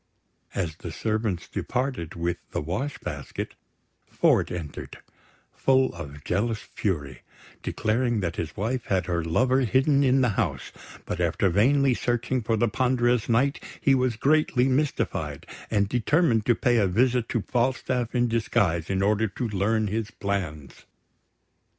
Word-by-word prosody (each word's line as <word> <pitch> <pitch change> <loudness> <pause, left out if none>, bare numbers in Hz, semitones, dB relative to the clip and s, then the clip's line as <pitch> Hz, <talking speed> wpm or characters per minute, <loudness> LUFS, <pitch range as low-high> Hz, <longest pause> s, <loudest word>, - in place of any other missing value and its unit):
As 85 -5 -2
the 85 - -7
servants 110 -1 -2
departed 125 - -3
with 85 0 -1
the - - -2
wash 110 - -3
basket, - - -6 0.5
Ford - - +2
entered, 85 -4 -6 0.6
full 130 -1 +2
of 75 -4 -9
jealous 110 +2 0
fury, 75 - -4 0.4
declaring 115 +1 0
that 85 -3 -3
his 75 -2 -4
wife 120 +5 -2
had 95 -2 0
her 85 -2 -1
lover 125 +11 +2
hidden 135 +3 +3
in 130 0 +4
the 125 - +3
house; 95 - -2 0.3
but 90 - -4
after 85 +3 +2
vainly 135 +7 +4
searching 120 +1 -1
for 115 0 0
the 120 - +2
ponderous 125 0 +1
Knight, 130 +5 +2 0.2
he 140 - +3
was 130 -3 +2
greatly 135 0 +2
mystified, 135 +2 -1 0.2
and 100 -1 +2
determined 125 - +2
to 120 - +5
pay 120 -1 +2
a 100 -3 +3
visit 120 +5 +2
to 115 - -1
Falstaff 125 -1 -1
in 120 0 +3
disguise, 95 -7 0
in 95 0 +1
order 105 +2 +2
to 115 +5 -4
learn 105 +2 +1
his 105 +1 -2
plans. 85 -8 -4
115 Hz, 145 wpm, -26 LUFS, 95-125 Hz, 0.6 s, to